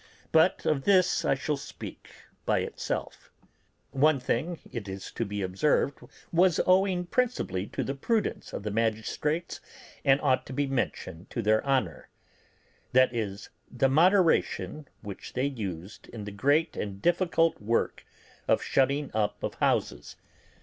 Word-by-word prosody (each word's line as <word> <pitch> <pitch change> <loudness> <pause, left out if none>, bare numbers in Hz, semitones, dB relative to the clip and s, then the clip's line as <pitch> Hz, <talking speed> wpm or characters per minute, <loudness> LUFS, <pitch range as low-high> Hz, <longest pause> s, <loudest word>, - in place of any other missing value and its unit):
But 160 +3 +3
of 135 -3 +1
this 185 -3 +4
I - - +2
shall 145 +2 -2
speak 140 - -9 0.3
by - - +1
itself. - - -5 0.6
One 145 +1 +3
thing, 145 +7 -1
it 105 -5 -5
is 95 0 -7
to 115 - -2
be 100 -1 -3
observed, 115 +9 +1 0.3
was 175 0 +4
owing 185 -1 +3
principally 175 - -1
to - - -3
the 135 - -2
prudence 215 - -1
of - - -5
the 105 - -3
magistrates, 115 +9 -1 0.4
and 135 -1 +4
ought 130 - +2
to - - -7
be 145 +2 0
mentioned 120 -9 -3
to 120 - -3
their 110 +1 +3
honour: 130 - -1 0.8
viz., 115 -6 +1 0.2
the 130 +2 +1
moderation 165 -2 +2
which 100 -2 -8
they 130 +2 0
used 100 -8 -5
in 110 -3 -8
the 105 - -6
great 145 +10 +2
and 100 -2 -4
difficult 165 - +2
work 115 +3 0 0.4
of - - +3
shutting 140 +2 +1
up 105 -1 -1
of - - -2
houses. - - 0
135 Hz, 145 wpm, -28 LUFS, 105-160 Hz, 0.8 s, this